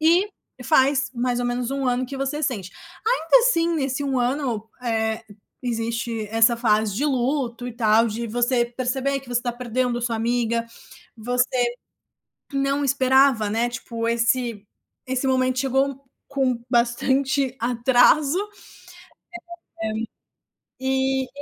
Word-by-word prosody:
e 340 Hz, +6 st, +4 dB, 0.4 s
faz, 270 Hz, -2 st, +3 dB
mais 245 Hz, 0 st, -1 dB
ou 245 Hz, -, -1 dB
menos, 245 Hz, 0 st, -2 dB
1 275 Hz, -1 st, -2 dB
ano 250 Hz, +1 st, +1 dB
que 270 Hz, +2 st, -7 dB
você 275 Hz, +3 st, -2 dB
sente. 215 Hz, -, -2 dB, 0.3 s
Ainda 465 Hz, -1 st, +4 dB
assim, 470 Hz, -9 st, +3 dB
nesse 275 Hz, -2 st, -1 dB
1 270 Hz, -2 st, 0 dB
ano, 245 Hz, -4 st, -1 dB
eh, 220 Hz, -2 st, -1 dB, 0.4 s
existe 230 Hz, -1 st, -2 dB
essa 225 Hz, +1 st, +4 dB
fase 215 Hz, -3 st, +1 dB
de 265 Hz, +8 st, -1 dB
luto 255 Hz, -3 st, -1 dB
e 245 Hz, -, -5 dB
tal, 225 Hz, 0 st, +3 dB
de 230 Hz, +2 st, -4 dB
você 240 Hz, +2 st, +1 dB
perceber 260 Hz, +3 st, -1 dB
que 265 Hz, -, -17 dB
você 245 Hz, -1 st, 0 dB
tá 240 Hz, -1 st, -2 dB
perdendo 245 Hz, 0 st, -2 dB
sua 235 Hz, -1 st, -1 dB
amiga. 230 Hz, 0 st, 0 dB, 0.5 s
Você 245 Hz, +2 st, +1 dB, 0.9 s
não 275 Hz, +1 st, 0 dB
esperava, 265 Hz, -4 st, +3 dB
né, 230 Hz, +3 st, 0 dB
tipo, 230 Hz, -1 st, -4 dB
esse 235 Hz, -2 st, 0 dB, 0.4 s
esse 260 Hz, +1 st, -1 dB
momento 255 Hz, -1 st, +1 dB
chegou 270 Hz, +1 st, 0 dB, 0.2 s
com 265 Hz, -3 st, 0 dB
bastante 265 Hz, +3 st, +1 dB
atraso, 250 Hz, +6 st, +3 dB, 2.4 s
eh, -, -, -9 dB
e 265 Hz, 0 st, +1 dB
enfim -, -, -13 dB
250 Hz, 130 wpm, -23 LUFS, 235-270 Hz, 2.4 s, e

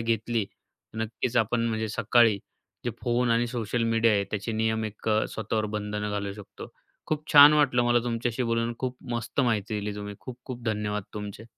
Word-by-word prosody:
घेतली 115 Hz, 0 st, 0 dB
तर 110 Hz, -, -17 dB
नक्कीच 115 Hz, +2 st, -2 dB
आपण 115 Hz, +1 st, +2 dB
म्हणजे 110 Hz, -1 st, -2 dB
सकाळी 115 Hz, 0 st, +3 dB, 0.5 s
जे 120 Hz, -, 0 dB
फोन 120 Hz, 0 st, +1 dB
आणि 115 Hz, +1 st, +3 dB
सोशल 120 Hz, -1 st, -2 dB
मीडिया 115 Hz, 0 st, +3 dB
आहे 100 Hz, -1 st, +2 dB
त्याचे 105 Hz, +2 st, -3 dB
नियम 110 Hz, 0 st, 0 dB
एक 110 Hz, +1 st, -6 dB
अ, 110 Hz, 0 st, +3 dB
स्वतःवर 110 Hz, 0 st, -2 dB
बंधनं 105 Hz, 0 st, -3 dB
घालू 100 Hz, -1 st, -3 dB
शकतो. 105 Hz, 0 st, -11 dB, 0.4 s
खूप 155 Hz, 0 st, -2 dB
छान 145 Hz, 0 st, +10 dB
वाटलं 140 Hz, -5 st, +3 dB
मला 120 Hz, 0 st, +4 dB
तुमच्याशी 120 Hz, +1 st, -1 dB
बोलून 115 Hz, 0 st, 0 dB
खूप 130 Hz, -1 st, -3 dB
मस्त 120 Hz, +3 st, -1 dB
माहिती 110 Hz, -4 st, 0 dB
दिली 105 Hz, 0 st, -4 dB
तुम्ही 105 Hz, 0 st, -6 dB
खूप-खूप 125 Hz, -1 st, -8 dB
धन्यवाद 105 Hz, -2 st, -1 dB
तुमचे. 105 Hz, +1 st, -6 dB
115 Hz, 175 wpm, -27 LUFS, 105-120 Hz, 0.5 s, छान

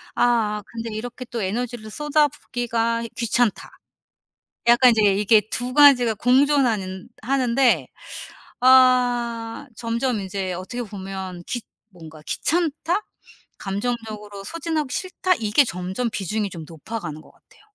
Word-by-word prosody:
'아 220 Hz, -4 st, +1 dB
근데 230 Hz, -1 st, -6 dB
이렇게 245 Hz, +3 st, -6 dB
또 235 Hz, -2 st, -5 dB
에너지를 225 Hz, +2 st, -3 dB
쏟아붓기가 245 Hz, -6 st, 0 dB
귀찮다.' 235 Hz, -1 st, 0 dB, 1.0 s
약간 245 Hz, +1 st, +7 dB
이제 220 Hz, -2 st, +2 dB
이게 210 Hz, +1 st, +4 dB
2 250 Hz, +1 st, -3 dB
가지가 265 Hz, -6 st, +6 dB
공존하는 245 Hz, -6 st, +2 dB
하는데 245 Hz, -, +2 dB, 0.7 s
아 245 Hz, -1 st, +3 dB
점점 230 Hz, 0 st, -1 dB
이제 190 Hz, -1 st, -4 dB
어떻게 190 Hz, +8 st, -5 dB
보면 190 Hz, -3 st, -7 dB
귀 240 Hz, -, -3 dB, 0.3 s
뭔가 160 Hz, -4 st, -13 dB
'귀찮다. 335 Hz, +4 st, -1 dB, 0.6 s
감정적으로 210 Hz, -1 st, -4 dB
소진하기 320 Hz, -4 st, -3 dB
싫다.' 370 Hz, 0 st, 0 dB
이게 225 Hz, +6 st, +3 dB
점점 185 Hz, +4 st, -3 dB
비중이 205 Hz, +2 st, -2 dB
좀 165 Hz, -3 st, -7 dB
높아 170 Hz, +8 st, -7 dB
가는 155 Hz, -6 st, -7 dB
것 -, -, -19 dB
같아요. -, -, -26 dB
230 Hz, 265 characters per minute, -23 LUFS, 205-255 Hz, 1.0 s, 약간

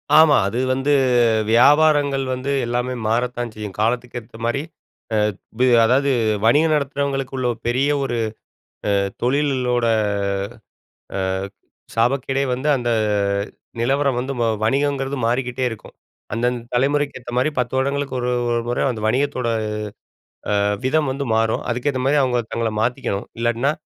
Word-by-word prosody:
ஆமா, 155 Hz, -2 st, +7 dB
அது 115 Hz, +5 st, -2 dB
வந்து, 135 Hz, +2 st, 0 dB, 0.6 s
வியாபாரங்கள் 140 Hz, +3 st, +4 dB
வந்து 130 Hz, +2 st, -3 dB
எல்லாமே 125 Hz, +2 st, -1 dB
மாறத்தான் 120 Hz, +1 st, -1 dB
செய்யும். 105 Hz, -3 st, -7 dB
காலத்துக்கு 120 Hz, +2 st, -1 dB
ஏத்த 110 Hz, 0 st, -15 dB
மாரி. 120 Hz, +4 st, 0 dB, 0.5 s
அ -, -, +2 dB, 0.4 s
வி 130 Hz, -, +4 dB, 0.2 s
அதாவது 130 Hz, +5 st, +3 dB, 0.4 s
வணிகம் 155 Hz, +7 st, +4 dB
நடத்துறவங்களுக்குள்ள 135 Hz, -2 st, -2 dB, 0.2 s
பெரிய 130 Hz, +4 st, +1 dB
ஒரு 120 Hz, -3 st, -2 dB, 0.8 s
அ -, -, +3 dB, 0.3 s
தொழிலோட 125 Hz, -2 st, +1 dB, 1.3 s
அ -, -, -1 dB, 0.8 s
சாபக்கேடே 135 Hz, +3 st, +1 dB
வந்து, 130 Hz, +4 st, -3 dB
அந்த 120 Hz, -1 st, -2 dB, 0.9 s
நிலவரம் 135 Hz, +1 st, +1 dB
வந்து 130 Hz, +2 st, -3 dB
வ -, -, +3 dB, 0.2 s
வணிகங்கிறது 140 Hz, +2 st, 0 dB
மாறிக்கிட்டே 125 Hz, +1 st, -1 dB
இருக்கும். 115 Hz, -2 st, -10 dB, 0.4 s
அந்தந்த 120 Hz, +2 st, 0 dB
தலைமுறைக்கு 140 Hz, +3 st, +1 dB
ஏத்த 120 Hz, -1 st, -9 dB
மாரி 130 Hz, +5 st, +3 dB
10 125 Hz, 0 st, -1 dB
வருடங்களுக்கு 140 Hz, +1 st, -1 dB
ஒரு 125 Hz, 0 st, -1 dB, 0.2 s
ஒரு 120 Hz, 0 st, +1 dB
முறை 120 Hz, -, -1 dB
அந்த 110 Hz, -3 st, -6 dB
வணிகத்தோட 130 Hz, +1 st, 0 dB, 1.1 s
அ -, -, +2 dB, 0.2 s
விதம் 150 Hz, +1 st, +2 dB
வந்து 140 Hz, +1 st, -3 dB
மாறும். 110 Hz, 0 st, +1 dB
அதுக்கேத்த 130 Hz, +2 st, -1 dB
மாதிரி 145 Hz, +2 st, +3 dB
அவுங்க 125 Hz, -2 st, +1 dB
தங்களை 115 Hz, -1 st, -1 dB
மாத்திக்கணும். 120 Hz, -4 st, -2 dB
இல்லாட்டினா, 120 Hz, +4 st, +1 dB
130 Hz, 130 wpm, -21 LUFS, 120-140 Hz, 1.3 s, ஆமா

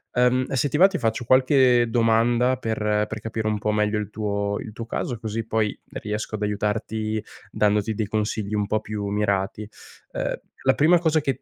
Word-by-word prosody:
Ehm, 125 Hz, +1 st, +3 dB
se 135 Hz, +2 st, +1 dB
ti 150 Hz, -, -1 dB
va, 185 Hz, -, +8 dB
ti 195 Hz, -2 st, +1 dB
faccio 115 Hz, +1 st, -1 dB
qualche 130 Hz, -2 st, +4 dB
domanda 120 Hz, +2 st, +2 dB
per 105 Hz, -2 st, 0 dB
per 110 Hz, -, -5 dB
capire 110 Hz, 0 st, -3 dB
un 105 Hz, -1 st, 0 dB
po' 105 Hz, +1 st, -1 dB
meglio 105 Hz, 0 st, +1 dB
il 105 Hz, 0 st, -4 dB
tuo 100 Hz, -1 st, -2 dB
il 110 Hz, -, -7 dB
tuo 115 Hz, +1 st, -7 dB
caso, 120 Hz, 0 st, -3 dB
così 110 Hz, 0 st, -4 dB
poi 110 Hz, -2 st, 0 dB, 0.2 s
riesco 105 Hz, +1 st, -4 dB
ad 105 Hz, -, -4 dB
aiutarti, 110 Hz, +1 st, -2 dB, 0.3 s
dandoti 105 Hz, +1 st, +1 dB
dei 110 Hz, -, -1 dB
consigli 105 Hz, 0 st, -2 dB
un 105 Hz, -1 st, 0 dB
po' 110 Hz, 0 st, +1 dB
più 105 Hz, -1 st, -4 dB
mirati. 100 Hz, 0 st, -1 dB, 0.4 s
Ehm, -, -, -3 dB, 0.3 s
la -, -, +4 dB
prima 165 Hz, +4 st, +5 dB
cosa 160 Hz, -2 st, +2 dB
che 135 Hz, -4 st, -2 dB
110 Hz, 190 wpm, -24 LUFS, 105-120 Hz, 0.4 s, va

